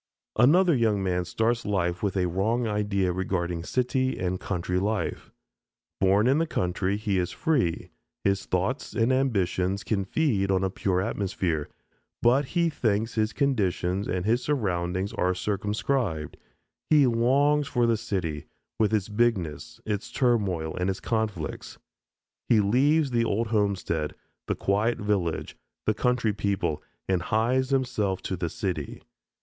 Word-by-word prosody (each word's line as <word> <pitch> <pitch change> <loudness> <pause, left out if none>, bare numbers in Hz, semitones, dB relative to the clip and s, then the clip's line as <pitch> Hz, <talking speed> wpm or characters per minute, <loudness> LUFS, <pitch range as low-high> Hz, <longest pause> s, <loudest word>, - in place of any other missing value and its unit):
Another 165 +8 +5
young 110 -5 +1
man 90 -1 0
starts 115 +6 0
life 90 -4 -1
with 100 -2 -1
a 90 - +2
wrong 110 +7 0
idea 105 -4 0
regarding 90 -2 -2
city 130 +4 0
and 90 0 -2
country 90 -1 -2
life. 105 +2 -2 0.7
Born 95 +3 +4
in 135 +4 +4
the 165 - +1
country 95 - -1
he 105 -3 0
is 90 - -1
free, 135 - 0 0.3
his 100 0 0
thoughts 95 +10 -1
and 120 +2 +2
ambitions 100 -7 0
can 100 -3 0
feed 105 -6 +1
on 95 -1 +2
a 95 - 0
pure 95 -1 0
atmosphere, 90 -6 -2 0.5
but 130 +4 +4
he 170 -1 +4
thinks 115 -7 0
his 110 0 +1
conditions 100 -8 0
and 90 0 -2
his 115 +3 +2
surroundings 95 -8 -1
are 90 0 +1
circumscribed; 105 - -1 0.5
he 150 -3 +6
longs 135 +5 +3
for 120 -1 +1
the 115 -1 +3
city, 85 -8 -3 0.3
with 110 -1 +3
its 100 -3 -1
bigness, 105 -9 -1
its 105 +1 -3
turmoil, 100 -11 +1
and 90 +1 0
its 95 - -2
conflicts. 110 -8 -3 0.7
He 115 - +5
leaves 135 +8 +3
the 120 -1 +2
old 115 0 0
homestead, 100 -8 0 0.3
the - - 0
quiet 105 +4 +1
village, 100 -6 -1 0.3
the 110 - +3
country 120 -1 +1
people, 95 -7 -1 0.3
and 95 -2 +1
hies 120 +7 +1
himself 125 -8 0
to 95 - -2
the 85 -1 -3
city. 90 - -4
105 Hz, 145 wpm, -26 LUFS, 90-120 Hz, 0.7 s, he